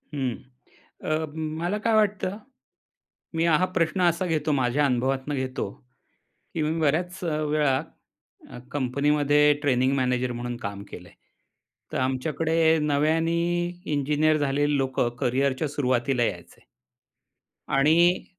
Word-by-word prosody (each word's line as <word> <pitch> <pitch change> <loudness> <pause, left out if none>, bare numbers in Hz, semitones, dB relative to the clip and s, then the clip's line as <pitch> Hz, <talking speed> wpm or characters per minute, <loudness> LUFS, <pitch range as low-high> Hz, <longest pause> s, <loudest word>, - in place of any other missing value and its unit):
हं. 130 -5 -1 0.7
अ, 155 +1 0 0.3
मला 175 +5 -1
काय 230 - +3
वाटतं? 205 -2 +1 1.0
मी 165 - +1
हा 170 +2 +3
प्रश्न 185 0 -1
असा 175 +1 +2
घेतो 155 -3 0
माझ्या 135 +2 +1
अनुभवातनं 130 +2 0
घेतो 130 -1 -3 0.9
की 160 - -1
मी 160 +2 -1
बऱ्याच 175 +5 0
वेळा 150 -4 +1 0.7
अ, - - -9
कंपनीमध्ये 145 +2 +2
ट्रेनिंग 130 -2 +2
मॅनेजर 125 -1 0
म्हणून 120 0 -5
काम 100 -3 -6
केलंय. 90 0 -10 0.8
तर - - -2
आमच्याकडे 160 +5 +1
नव्याने 160 +3 +1 0.5
इंजिनिअर 150 +2 +2
झालेली 145 0 +1
लोकं 130 -3 0
करियरच्या 130 +3 +1
सुरुवातीला 130 -2 0
यायचे. 85 -6 -5 1.0
आणि, 165 +6 +3
145 Hz, 110 wpm, -25 LUFS, 130-160 Hz, 1.0 s, काय